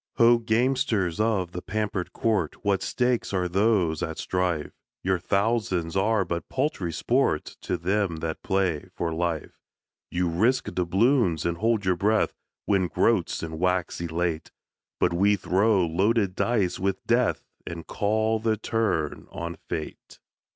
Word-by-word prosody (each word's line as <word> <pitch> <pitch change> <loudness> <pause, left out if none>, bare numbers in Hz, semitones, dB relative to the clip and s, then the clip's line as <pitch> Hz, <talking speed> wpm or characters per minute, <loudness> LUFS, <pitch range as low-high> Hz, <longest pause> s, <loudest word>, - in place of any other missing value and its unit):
Ho, 115 0 +6
gamesters 115 - +1
of 105 -5 +1
the 90 - -5
pampered 105 -4 -3
court! 105 -9 -1
What 100 -2 +2
stakes 125 -4 0
are 90 -2 +1
those 95 -4 +2
at 80 -1 -3
strife? 90 -5 -1 0.3
Your 95 -1 +1
thousands 100 -4 0
are 105 +1 +2
but 85 -1 -4
paltry 95 - -1
sport 120 - +1 0.2
To - - -2
them 95 0 0
that 80 0 -4
play 95 -6 0
for 85 -1 -2
life. 85 -1 -3 0.5
You 90 0 0
risk 110 +10 +2
doubloons, 95 - +2
and 85 0 0
hold 110 0 +1
your 90 -1 +2
breath. 105 +4 +2 0.3
Win 95 -3 +2
groats, - - +1
and 80 -1 -5
wax 90 -1 0
elate; 85 -1 -2 0.5
But 90 - +2
we 100 +4 +4
throw 100 0 +2
loaded 95 +4 +1
dice 100 -7 0
with 95 0 -2
Death, 120 +1 +2 0.2
And 85 -1 -6
call 110 +2 0
the 110 0 0
turn 105 -9 -1
on 85 +1 -5
Fate. 80 - -6
95 Hz, 145 wpm, -26 LUFS, 85-110 Hz, 0.5 s, Ho